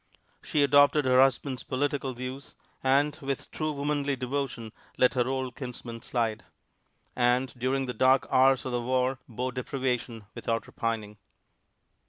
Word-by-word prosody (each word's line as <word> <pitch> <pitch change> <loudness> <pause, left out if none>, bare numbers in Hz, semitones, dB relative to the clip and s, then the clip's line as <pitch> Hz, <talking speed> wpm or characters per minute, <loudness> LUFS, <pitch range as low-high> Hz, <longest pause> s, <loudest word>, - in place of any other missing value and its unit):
She 150 - +1
adopted 145 +1 +5
her 130 0 +5
husband's 135 0 +1
political 135 -1 -2
views 130 +2 -7 0.3
and 140 +3 +3
with 135 -2 -4
true 155 -1 -2
womanly 145 -1 -1
devotion 125 -3 -3 0.3
let 125 - +4
her 125 -2 +1
old 130 -2 -2
kinsmen 120 -3 -7
slide; 115 -3 -1 0.7
and 125 +1 +2
during 130 +2 0
the 125 - -4
dark 130 +1 +4
hours 130 0 +4
of 130 - -3
the 120 0 -1
war 130 +1 0
bore 125 +3 -3
deprivation 125 -3 -3
without 115 0 -2
repining. 110 -3 -4
130 Hz, 140 wpm, -28 LUFS, 125-135 Hz, 0.7 s, adopted